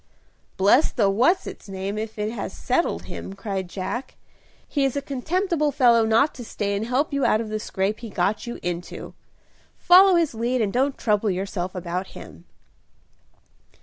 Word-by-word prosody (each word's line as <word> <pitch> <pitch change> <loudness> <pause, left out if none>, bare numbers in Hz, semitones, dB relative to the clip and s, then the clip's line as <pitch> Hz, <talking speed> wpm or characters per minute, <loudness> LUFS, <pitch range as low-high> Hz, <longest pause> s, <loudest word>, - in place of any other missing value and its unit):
"Bless 205 +10 +4
the 205 -5 +2
what's 255 - +3
its - - -9
name 195 +1 -4
if 220 +1 -5
it 210 +1 -2
has 205 -4 -5
settled 260 +7 0
him," 190 - -7
cried 195 -2 -4
Jack. 195 +8 -5 0.5
"He 285 - 0
is 270 0 0
a - - +2
contemptible 305 +3 0
fellow 240 -5 +4
not 230 +7 +3
to 245 - -8
stay 200 -2 -2
and 215 +3 -2
help 275 +5 0
you 280 -1 0
out 215 - +3
of 225 -1 -4
the 215 0 -2
scrape 200 0 -2
he 230 - -7
got 200 +4 -1
you 235 - -5
into. 175 0 -5 0.6
Follow 370 +1 +7
his 335 -5 +2
lead 240 +3 -1
and 210 -4 0
don't 270 +3 +1
trouble 210 -1 +1
yourself 185 -1 -3
about 180 +1 -3
him." - - -12
220 Hz, 175 wpm, -24 LUFS, 195-270 Hz, 0.6 s, Follow